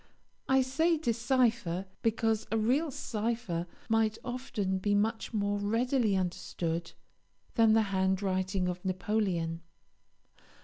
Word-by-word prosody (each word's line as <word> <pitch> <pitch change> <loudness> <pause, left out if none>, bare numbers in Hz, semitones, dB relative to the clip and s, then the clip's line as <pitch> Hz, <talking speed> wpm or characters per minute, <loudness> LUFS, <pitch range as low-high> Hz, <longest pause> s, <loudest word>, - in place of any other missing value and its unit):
I 265 0 +5
say 320 +6 +2
decipher, 235 - +1 0.2
because 225 -1 +1
a 225 - +2
real 260 +9 +2
cipher 220 -8 -2 0.2
might 225 -1 +2
often 230 -7 -2
be 205 +2 +1
much 220 +2 0
more 205 -2 0
readily 230 +1 +1
understood 170 -2 -2 0.6
than 225 -2 +5
the 220 0 +5
handwriting 190 0 +1
of 180 0 -4
Napoleon. 185 -4 -1
215 Hz, 105 wpm, -31 LUFS, 190-235 Hz, 0.6 s, I